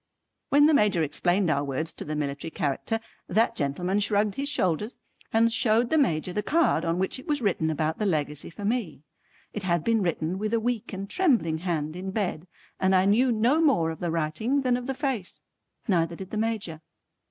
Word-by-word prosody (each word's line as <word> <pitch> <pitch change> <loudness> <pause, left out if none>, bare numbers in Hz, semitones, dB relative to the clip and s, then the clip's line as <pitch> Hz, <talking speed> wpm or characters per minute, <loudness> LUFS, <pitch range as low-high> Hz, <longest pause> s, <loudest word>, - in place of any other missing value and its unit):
When 290 +1 +6
the 310 - +5
Major 205 - +3
explained 175 +4 +1
our 140 -2 +1
words 145 +3 -3
to - - -7
the 155 - -4
military 145 +1 -3
character, 160 +7 -2 0.3
that 220 +5 +2
gentleman 180 +8 -1
shrugged 205 0 +1
his 280 +5 -3
shoulders 210 - -1 0.4
and 230 +1 +3
showed 225 +1 +2
the 315 - +3
Major 180 - +1
the 210 - 0
card 300 - +2
on 165 +1 0
which 190 +7 -1
it 260 - -13
was 295 -2 +1
written 170 -6 +1
about 155 0 -1
the 210 - +1
Legacy 150 -4 -2
for 200 +4 -8
me. 205 - -2 0.5
It 210 - -4
had 175 -4 0
been 225 +1 +2
written 170 0 -1
with 215 +2 0
a - - +2
weak 235 -1 -2
and 195 0 -5
trembling 230 - +2
hand 160 -3 -2
in 185 +2 -5
bed, 190 -4 -2 0.3
and 190 0 +3
I 185 0 +4
knew 240 +6 +4
no 240 +8 +3
more 215 - +3
of 160 - -8
the 175 - -2
writing 165 - 0
than 255 -2 +2
of 245 +1 -4
the 270 - -2
face. 260 - -3 0.5
Neither 170 -4 +1
did 190 +2 -9
the 215 - -3
Major. 215 -8 -2
190 Hz, 205 wpm, -26 LUFS, 160-230 Hz, 0.5 s, When